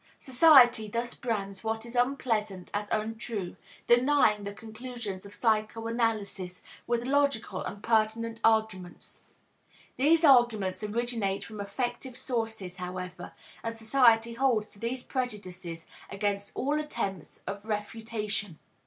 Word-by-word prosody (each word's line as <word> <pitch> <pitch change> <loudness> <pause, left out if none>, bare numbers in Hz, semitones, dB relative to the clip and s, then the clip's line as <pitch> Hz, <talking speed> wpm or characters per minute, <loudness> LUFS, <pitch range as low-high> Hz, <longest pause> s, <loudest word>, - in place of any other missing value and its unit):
Society 250 -5 +6
thus 235 +3 -3
brands 200 -4 -3
what 225 0 -2
is 235 +1 -8
unpleasant 225 -7 0
as 205 0 -2
untrue, 220 -3 -3 0.3
denying 240 -4 +4
the 200 - -4
conclusions 220 -2 -7
of 200 - -12
psychoanalysis 220 -4 -1 0.2
with 240 0 0
logical 270 -7 +1
and 205 - -7
pertinent 225 0 +1
arguments. 220 -5 0 0.7
These 315 +5 +4
arguments 235 - +4
originate 215 -2 -1
from 215 -2 -7
affective 245 +4 -4
sources, 220 -8 -3
however, 180 0 -6 0.3
and 230 0 -4
society 230 0 +4
holds 235 -4 +1
to 200 - -18
these 245 +3 -3
prejudices 185 - -5 0.2
against 200 0 -2
all 290 +3 0
attempts 195 - -4
at 200 +1 -5
refutation. 210 -3 -3
225 Hz, 115 wpm, -29 LUFS, 200-240 Hz, 0.7 s, Society